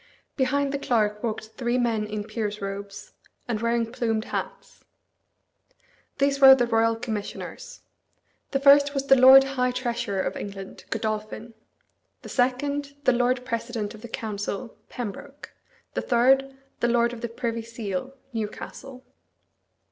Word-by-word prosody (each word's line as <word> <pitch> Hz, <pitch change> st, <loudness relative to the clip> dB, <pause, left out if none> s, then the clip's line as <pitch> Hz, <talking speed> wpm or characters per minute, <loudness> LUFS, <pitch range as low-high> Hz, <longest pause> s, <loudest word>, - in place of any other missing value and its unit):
Behind 275 Hz, +1 st, +1 dB
the 280 Hz, -, -2 dB
clerk 210 Hz, -5 st, 0 dB
walked 220 Hz, -2 st, -4 dB
three 240 Hz, +1 st, -1 dB
men 225 Hz, -4 st, 0 dB
in 210 Hz, 0 st, -4 dB
peers' 215 Hz, -1 st, -4 dB
robes, 200 Hz, 0 st, -7 dB, 0.4 s
and 225 Hz, -3 st, -2 dB
wearing 230 Hz, -1 st, 0 dB
plumed 225 Hz, -2 st, -1 dB
hats. -, -, -6 dB, 1.3 s
These 280 Hz, 0 st, +1 dB
were 265 Hz, -1 st, +11 dB
the 245 Hz, -2 st, +1 dB
Royal 230 Hz, -1 st, +2 dB
Commissioners. 225 Hz, -, -6 dB, 0.7 s
The 275 Hz, -, 0 dB
first 285 Hz, +1 st, +6 dB
was 275 Hz, 0 st, -1 dB
the 270 Hz, -, +6 dB
Lord 265 Hz, +1 st, +9 dB
High 265 Hz, -2 st, 0 dB
Treasurer 240 Hz, -5 st, -2 dB
of -, -, -3 dB
England, 195 Hz, -1 st, -8 dB
Godolphin; 215 Hz, +1 st, -4 dB, 0.7 s
the -, -, -9 dB
second, 280 Hz, +3 st, 0 dB
the 255 Hz, -2 st, +4 dB
Lord 245 Hz, +1 st, +1 dB
President 230 Hz, -3 st, -3 dB
of 215 Hz, -, -12 dB
the 240 Hz, -, -9 dB
Council, 215 Hz, +1 st, -4 dB
Pembroke; 260 Hz, +5 st, -7 dB, 0.4 s
the -, -, -1 dB
third, 270 Hz, +2 st, +3 dB, 0.3 s
the 240 Hz, -, +2 dB
Lord 235 Hz, 0 st, +2 dB
of 230 Hz, -, -8 dB
the 235 Hz, -, -3 dB
Privy 230 Hz, 0 st, -3 dB
Seal, 230 Hz, +2 st, -5 dB, 0.2 s
Newcastle. 250 Hz, +4 st, -6 dB
235 Hz, 140 wpm, -25 LUFS, 220-265 Hz, 1.3 s, were